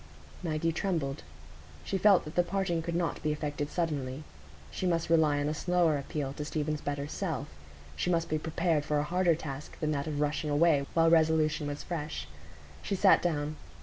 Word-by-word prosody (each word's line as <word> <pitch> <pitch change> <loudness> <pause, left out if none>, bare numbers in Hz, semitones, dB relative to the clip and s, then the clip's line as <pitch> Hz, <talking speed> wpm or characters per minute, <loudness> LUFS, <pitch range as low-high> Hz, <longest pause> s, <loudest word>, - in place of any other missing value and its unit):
Maggie 165 -1 0
trembled. 160 -6 -2 0.6
She 195 - -2
felt 200 -1 +5
that 155 - -7
the 175 - +4
parting 175 -1 -1
could 170 +1 -3
not 170 -1 -1
be 155 - 0
effected 145 -1 -3
suddenly. 150 -5 -2 0.5
She 185 - -2
must 165 -1 0
rely 155 -3 +4
on 145 - 0
a 150 - 0
slower 175 -1 +2
appeal 140 -1 -3
to 150 - -5
Stephen's 150 0 -2
better 145 0 -3
self; 160 -4 -3 0.5
she - - -1
must 170 -2 +1
be 155 - -1
prepared 160 -1 0
for 150 0 0
a 145 - +1
harder 175 +1 +2
task 145 -2 -7
than 155 -1 0
that 140 0 -2
of 150 -2 -2
rushing 150 +1 0
away 145 -2 +3
while 165 0 +5
resolution 160 -2 +3
was 145 0 -4
fresh. 150 - -4 0.5
She 200 - -2
sat 195 +1 +5
down. 155 -3 -1
155 Hz, 185 wpm, -30 LUFS, 145-170 Hz, 0.6 s, felt